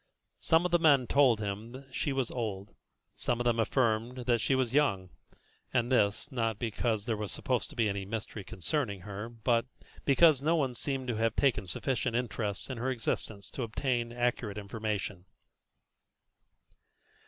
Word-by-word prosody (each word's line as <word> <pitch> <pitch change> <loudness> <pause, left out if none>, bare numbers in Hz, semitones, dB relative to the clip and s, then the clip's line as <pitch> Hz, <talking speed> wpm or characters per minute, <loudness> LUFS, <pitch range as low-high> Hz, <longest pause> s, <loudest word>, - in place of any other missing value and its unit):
Some 165 +2 +3
of 180 - 0
the 175 - +4
men 145 -6 +5
told 130 -4 +4
him 105 +3 -4
that 135 0 -11
she 145 - -1
was 135 -3 -1
old, 105 -5 -4 0.4
some 120 - -1
of - - 0
them 120 -1 +2
affirmed 120 +1 +1
that 120 -2 +2
she 135 - +2
was 130 -2 0
young, 100 -11 +2 0.6
and 120 0 +1
this, 105 +4 +2
not 115 -4 0
because 110 -1 -1
there 115 - 0
was 105 -1 -4
supposed 125 -3 -1
to - - -11
be 115 -3 +2
any 100 -1 -2
mystery 105 0 -5
concerning 100 - -2
her, 105 +3 -6
but 115 +1 0 0.4
because 140 0 +5
no 160 +4 +3
one 135 -6 +1
seemed 135 +1 -3
to 115 - -1
have 115 0 +1
taken 120 -8 +2
sufficient 125 +4 -1
interest 115 -4 -2
in 125 - -5
her 125 +3 -1
existence 110 -5 -3
to - - -5
obtain 120 0 -1
accurate 120 -3 -1
information. 105 -2 -3
120 Hz, 165 wpm, -31 LUFS, 105-130 Hz, 0.6 s, men